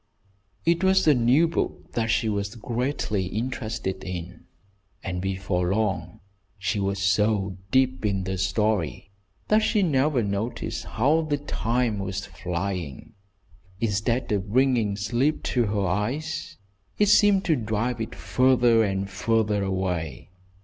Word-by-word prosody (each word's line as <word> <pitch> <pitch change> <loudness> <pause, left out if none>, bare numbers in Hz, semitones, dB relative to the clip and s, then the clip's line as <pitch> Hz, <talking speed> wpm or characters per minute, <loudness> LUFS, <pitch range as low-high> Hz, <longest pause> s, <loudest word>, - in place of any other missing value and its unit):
It 170 +2 +2
was 190 -2 +4
a 150 - +7
new 130 +6 +4
book 165 - -3
that 115 -1 -1
she 110 +1 +2
was 100 0 -2
greatly 115 -4 -2
interested 110 -3 -3
in, 90 -2 -7 0.6
and 90 -1 -3
before 95 -1 -1
long 95 -6 -2 0.4
she 100 +2 -1
was 100 0 -1
so 95 0 +1
deep 125 -7 +2
in 100 -3 0
the 95 0 -3
story 95 -2 0 0.4
that 215 - +5
she 215 -1 +2
never 140 -5 +2
noticed 105 +4 -3
how 145 +8 +2
the 150 -2 -1
time 120 -5 -1
was 95 0 -3
flying. 90 -5 -5 0.7
Instead 115 +3 0
of 100 -1 -1
bringing 120 -5 +2
sleep 120 +9 0
to 120 -3 +1
her 100 -1 0
eyes, 145 - -2 0.4
it 210 -1 +3
seemed 205 -2 +5
to 160 - +3
drive 115 0 -2
it 110 - -5
farther 125 -3 +3
and 95 -1 -1
farther 105 +1 0
away. 95 -3 -3
110 Hz, 135 wpm, -25 LUFS, 95-130 Hz, 0.7 s, a